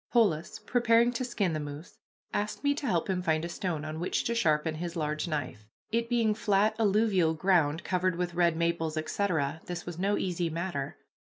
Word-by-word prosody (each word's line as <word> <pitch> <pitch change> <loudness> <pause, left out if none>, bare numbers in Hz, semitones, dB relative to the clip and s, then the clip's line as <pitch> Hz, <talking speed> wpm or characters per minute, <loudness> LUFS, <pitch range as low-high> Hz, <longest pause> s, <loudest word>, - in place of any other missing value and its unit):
Polis, 190 -10 +2
preparing 240 0 +3
to 245 - -2
skin 205 -8 -1
the 155 - -1
moose, 145 +2 -8 0.3
asked 210 +6 -2
me 285 0 +3
to 285 -1 -4
help 175 -6 +1
him 185 -2 0
find 160 -2 +1
a - - -4
stone 170 -3 -3
on 155 +1 -5
which 175 - 0
to 235 - 0
sharpen 160 -8 +2
his 170 +2 -5
large 155 0 -1
knife. 145 -9 -4 0.2
It 230 +1 0
being 230 -3 +2
flat 210 0 +2
alluvial 200 -6 +3
ground, 165 -3 +2
covered 185 -1 0
with 175 0 -2
red 170 -2 +2
maples, 170 -1 0
etc., 155 -2 -1
this 175 -1 -5
was 175 -1 -6
no 200 +2 +1
easy 175 -2 -1
matter. 165 -4 -3
175 Hz, 190 wpm, -29 LUFS, 160-205 Hz, 0.3 s, preparing